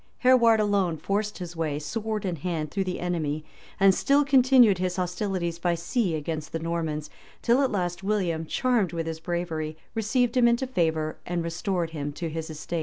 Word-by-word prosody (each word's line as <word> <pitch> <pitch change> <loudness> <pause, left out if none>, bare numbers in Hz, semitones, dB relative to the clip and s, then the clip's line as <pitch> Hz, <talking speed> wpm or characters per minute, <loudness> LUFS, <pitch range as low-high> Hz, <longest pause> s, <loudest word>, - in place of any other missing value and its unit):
Hereward 235 -3 +5
alone 200 -5 +1
forced 205 +6 -2
his 175 -2 -7
way, 155 -3 -1
sword 210 +7 -3
in 180 -3 -2
hand, 155 -2 -3
through 195 -1 -1
the 185 - -3
enemy; 155 -4 -2 0.3
and 195 0 +6
still 280 +8 +3
continued 255 -7 +5
his 180 -1 -1
hostilities 180 -2 -2
by 175 0 +1
sea 175 +1 -1
against 155 0 -4
the - - 0
Normans, 160 -2 -3 0.3
till 245 +3 +4
at 270 - +2
last 175 -3 -2
William, 180 -6 -1
charmed 235 -7 +1
with 165 -1 -2
his 160 -1 -4
bravery, 160 -2 -3 0.2
received 230 +2 +1
him 245 -2 +5
into 235 +2 +2
favor, 160 -10 0
and 175 -1 -1
restored 170 0 -2
him 145 -2 -4
to 165 +2 -4
his 160 0 -5
estate. 160 +2 -4
175 Hz, 180 wpm, -26 LUFS, 160-215 Hz, 0.3 s, and